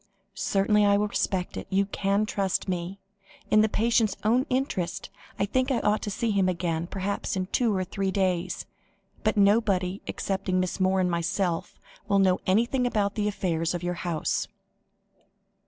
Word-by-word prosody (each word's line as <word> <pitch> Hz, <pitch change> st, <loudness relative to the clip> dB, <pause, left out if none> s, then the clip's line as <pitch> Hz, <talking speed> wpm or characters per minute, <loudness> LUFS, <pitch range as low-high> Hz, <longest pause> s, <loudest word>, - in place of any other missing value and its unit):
"Certainly 210 Hz, +1 st, +2 dB
I 200 Hz, 0 st, +4 dB
will 210 Hz, +1 st, 0 dB
respect 185 Hz, -2 st, -1 dB
it; -, -, -6 dB
you 195 Hz, +1 st, +2 dB
can 200 Hz, +1 st, 0 dB
trust 195 Hz, -3 st, -1 dB
me. 180 Hz, +1 st, -3 dB, 0.5 s
In 215 Hz, -, +6 dB
the 215 Hz, -, +3 dB
patient's 225 Hz, -1 st, +2 dB
own 240 Hz, +5 st, +2 dB
interest, 255 Hz, -9 st, -2 dB, 0.3 s
I 200 Hz, -, +1 dB
think 255 Hz, +6 st, 0 dB
I 265 Hz, -, +2 dB
ought 210 Hz, +1 st, +1 dB
to 210 Hz, -, -3 dB
see 225 Hz, +2 st, -1 dB
him 195 Hz, -2 st, +2 dB
again, 170 Hz, -2 st, -2 dB
perhaps 195 Hz, +2 st, -3 dB
in 185 Hz, -1 st, -1 dB
two 220 Hz, +2 st, +1 dB
or 185 Hz, -, 0 dB
three 195 Hz, +2 st, -2 dB
days; 185 Hz, -3 st, -1 dB, 0.6 s
but 215 Hz, -1 st, +1 dB
nobody 200 Hz, -2 st, +2 dB
excepting 190 Hz, -1 st, -1 dB
Miss 185 Hz, +1 st, -2 dB
Moore 190 Hz, 0 st, +2 dB
and 180 Hz, -1 st, +1 dB
myself 175 Hz, 0 st, -1 dB, 0.3 s
will 200 Hz, -, +3 dB
know 190 Hz, -2 st, +3 dB
anything 235 Hz, +6 st, +2 dB
about 205 Hz, -4 st, 0 dB
the 210 Hz, -1 st, -1 dB
affairs 170 Hz, -4 st, -1 dB
of 175 Hz, -, -5 dB
your 175 Hz, 0 st, -1 dB
house." 170 Hz, -4 st, -1 dB
195 Hz, 170 wpm, -27 LUFS, 185-210 Hz, 0.6 s, In